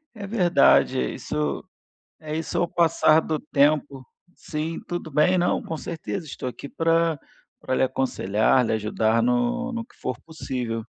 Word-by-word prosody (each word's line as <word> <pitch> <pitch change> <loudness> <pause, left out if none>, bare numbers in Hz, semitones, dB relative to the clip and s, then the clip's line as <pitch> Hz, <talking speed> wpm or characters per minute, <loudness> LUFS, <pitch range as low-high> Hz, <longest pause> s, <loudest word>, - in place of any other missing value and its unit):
É 205 -2 -7
verdade, 190 -5 +4 0.2
isso 75 -2 -3 0.6
isso 155 +1 -4
é - - +2
o 175 - +1
passar 160 -2 +4
do 155 -1 -2
tempo. 140 -2 +1 0.3
Sim, 155 +1 -4
tudo 175 -2 -5
bem, 155 +6 +3
não, 180 0 +1
com 160 - -5
certeza. 165 +3 -5
Estou 130 -3 -5
aqui 135 - -9
pra 165 0 +1 0.4
pra 130 - -3
lhe - - +2
aconselhar, 130 -3 +1
lhe 115 - 0
ajudar 110 +1 +1
no 125 - 0
no 230 -1 -4
que - - -24
for - - -4
possível. 125 -8 -5
150 Hz, 155 wpm, -24 LUFS, 125-165 Hz, 0.6 s, verdade